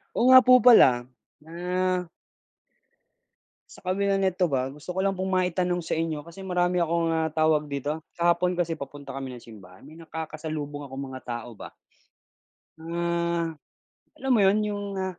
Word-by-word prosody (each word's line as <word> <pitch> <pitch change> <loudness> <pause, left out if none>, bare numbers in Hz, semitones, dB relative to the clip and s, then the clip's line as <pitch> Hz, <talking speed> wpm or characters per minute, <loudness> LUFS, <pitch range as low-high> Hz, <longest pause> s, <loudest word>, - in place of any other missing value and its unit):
Oo 240 - +2
nga 260 - +11
po 255 0 +5
pala, 130 - +7 0.4
na 180 +2 -2 1.7
Sa - - -15
kabila 195 +1 0
nito 185 -1 +1
ba, 135 -4 -1
gusto 150 +6 -8
ko 190 - -1
lang 195 -1 0
pong 190 0 -2
maitanong 180 -1 0
sa 160 - -3
inyo, 160 -2 -2
kasi 170 +4 -11
marami 180 0 +1
akong, 170 0 +1
ah, 160 -1 0
tawag 155 -1 +2
dito? 145 +2 -4
Kahapon 175 +1 +1
kasi, 170 -2 -2
papunta 140 -1 -8
kami 130 -2 -6
ng 120 - -10
simbahan, 95 -5 -15
may 155 +4 -14
nakakasalubong 155 -3 -6
akong 135 0 -7
mga 130 0 -8
tao 120 -2 -6
ba. - - -10 1.0
Mga, 170 0 -2 0.6
alam 265 - -4
mo 230 - +4
'yon, 195 +2 +4
yung 205 -1 -3
ah 190 - -1
165 Hz, 160 wpm, -26 LUFS, 145-180 Hz, 1.7 s, nga